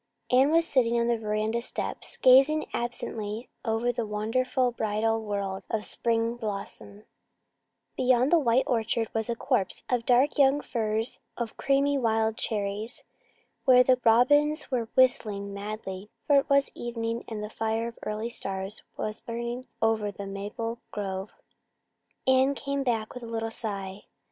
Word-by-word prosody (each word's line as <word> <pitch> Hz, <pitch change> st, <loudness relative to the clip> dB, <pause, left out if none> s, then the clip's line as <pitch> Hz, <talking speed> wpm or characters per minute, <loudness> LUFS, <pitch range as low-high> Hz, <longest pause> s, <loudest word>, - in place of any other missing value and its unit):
Anne 260 Hz, +3 st, +5 dB
was 330 Hz, +1 st, +4 dB
sitting 235 Hz, -3 st, +2 dB
on 235 Hz, -, +2 dB
the 240 Hz, -, +3 dB
veranda 215 Hz, +1 st, -1 dB
steps, -, -, -4 dB
gazing 275 Hz, +4 st, +6 dB
absently 230 Hz, -1 st, -4 dB
over 230 Hz, +1 st, 0 dB
the 240 Hz, 0 st, -2 dB
wonderful 235 Hz, +4 st, 0 dB
bridal 225 Hz, 0 st, 0 dB
world 200 Hz, -2 st, -3 dB
of 215 Hz, -1 st, -2 dB
spring 230 Hz, 0 st, 0 dB
blossom, 205 Hz, -2 st, -6 dB, 0.9 s
Beyond 255 Hz, +1 st, +3 dB
the 340 Hz, -, +6 dB
white 255 Hz, -2 st, +3 dB
orchard 225 Hz, -1 st, 0 dB
was 220 Hz, +1 st, -2 dB
a 235 Hz, -, 0 dB
copse 190 Hz, -4 st, -1 dB
of 245 Hz, -2 st, 0 dB
dark 255 Hz, +5 st, +3 dB
young 275 Hz, +1 st, +5 dB
firs 220 Hz, -1 st, -2 dB, 0.2 s
and 235 Hz, -2 st, -4 dB
creamy 280 Hz, +1 st, +2 dB
wild 220 Hz, -2 st, +1 dB
cherries, 210 Hz, +2 st, -3 dB, 0.6 s
where 250 Hz, -2 st, +7 dB
the 255 Hz, 0 st, +3 dB
robins 290 Hz, +7 st, +4 dB
were 235 Hz, -3 st, -1 dB
whistling 215 Hz, -6 st, +2 dB
madly; 200 Hz, -1 st, -6 dB, 0.2 s
for 285 Hz, -, +5 dB
it 275 Hz, -, +1 dB
was 280 Hz, 0 st, +3 dB
evening 230 Hz, -1 st, -3 dB
and 215 Hz, -2 st, -5 dB
the 210 Hz, -, -5 dB
fire 225 Hz, +1 st, -1 dB
of 230 Hz, -, -15 dB
early 215 Hz, +2 st, -3 dB
stars 195 Hz, 0 st, -4 dB, 0.2 s
was 215 Hz, 0 st, -3 dB
burning 235 Hz, +2 st, -5 dB, 0.2 s
over 220 Hz, -2 st, +2 dB
the 200 Hz, 0 st, -7 dB
maple 210 Hz, +4 st, -5 dB
grove. 195 Hz, -1 st, -4 dB, 1.0 s
Anne 260 Hz, +1 st, +4 dB
came 280 Hz, 0 st, -2 dB
back 230 Hz, -5 st, -1 dB
with 250 Hz, -, -8 dB
a 235 Hz, -, -8 dB
little 225 Hz, 0 st, -3 dB
sigh. 200 Hz, -3 st, -5 dB
230 Hz, 150 wpm, -27 LUFS, 215-255 Hz, 1.0 s, where